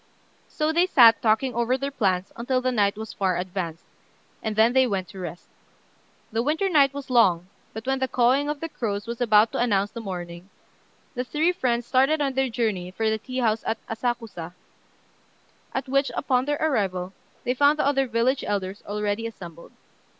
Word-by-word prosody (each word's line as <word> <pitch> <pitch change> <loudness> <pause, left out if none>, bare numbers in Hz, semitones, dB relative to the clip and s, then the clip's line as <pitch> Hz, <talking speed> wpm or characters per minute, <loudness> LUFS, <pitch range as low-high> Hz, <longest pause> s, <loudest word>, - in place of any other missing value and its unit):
So 310 +1 -1
they 345 +2 +3
sat 235 -9 +6
talking 235 +3 +2
over 235 +2 +1
their 275 +1 -3
plans 190 -7 0
until 255 +2 0
the 255 0 0
night 205 -3 +1
was 220 0 -7
far 190 -3 0
advanced, 180 -3 -4 0.6
and 220 -1 -3
then 225 +3 +4
they 260 -1 +4
went 190 -4 -2
to 195 - -10
rest. 175 -1 -7 0.8
The 225 +1 0
winter 315 +9 0
night 285 -6 +4
was 280 -2 -8
long; 185 -8 +4 0.3
but 220 +1 -8
when 265 0 0
the 260 - 0
cawing 260 +4 +2
of 295 -1 -4
the 330 - -2
crows 205 -9 -4
was 235 +1 -6
about 215 -1 +4
to - - -3
announce 205 -4 +1
the 230 - -7
morning, 175 -2 -7 0.6
the 250 -2 -2
three 310 +7 +1
friends 245 -9 -1
started 270 +5 +3
on 275 -2 0
their 265 0 0
journey 215 -6 -2
for 220 +4 -1
the 220 - -1
tea 255 +3 -7
house 220 -2 +1
at 225 - 0
Asakusa, 225 -7 -4 1.2
at 265 - -3
which, 275 +1 +1
upon 255 -2 +1
their 290 0 0
arrival, 195 -11 -1 0.3
they 250 - 0
found 285 +3 +4
the - - +1
other 270 -1 +2
village 240 +4 +1
elders 195 -1 -3
already 210 +2 -2
assembled. 170 -7 -11
235 Hz, 185 wpm, -25 LUFS, 200-265 Hz, 1.2 s, sat